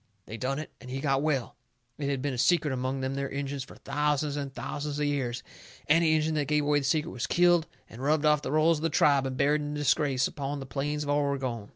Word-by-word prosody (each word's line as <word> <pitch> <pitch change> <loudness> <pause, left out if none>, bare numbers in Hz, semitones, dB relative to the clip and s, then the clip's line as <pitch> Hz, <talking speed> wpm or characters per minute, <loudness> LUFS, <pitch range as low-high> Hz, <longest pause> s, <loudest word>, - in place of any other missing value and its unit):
They 110 - -7
done 130 +4 -2
it. 155 - -6
And 125 - -10
he 130 +1 -3
got 135 -1 +1
well. 140 -5 -1 0.4
It 140 -1 -1
had 135 -2 -2
been 145 -2 -1
a - - -4
secret 155 -2 +3
among 130 +1 -2
them 130 +1 -2
there 140 0 -2
Injuns 140 0 -3
fur 135 - -13
thousands 150 0 -1
and 140 -2 -4
thousands 145 +2 -4
of 150 - 0
years. 130 -4 -2 0.4
Any 160 +1 +4
Injun 155 0 +1
that 150 -3 0
give 150 -1 +1
away 145 0 +3
the 140 - -4
secret 155 +3 +1
was 120 - -3
killed 175 -2 +4 0.2
and 115 - -11
rubbed 150 +2 +2
off 150 -1 +4
the - - -4
rolls 155 +1 +3
of - - -9
the 165 - +1
tribe 140 -2 +3
and 130 -1 -5
buried 150 +3 +2
in 145 0 -4
disgrace 145 -2 +2
upon 145 -2 -4
the 135 - -6
plains 145 +4 -2
of 145 - -2
Oregon. 135 -7 -1
145 Hz, 245 wpm, -28 LUFS, 135-150 Hz, 0.4 s, Any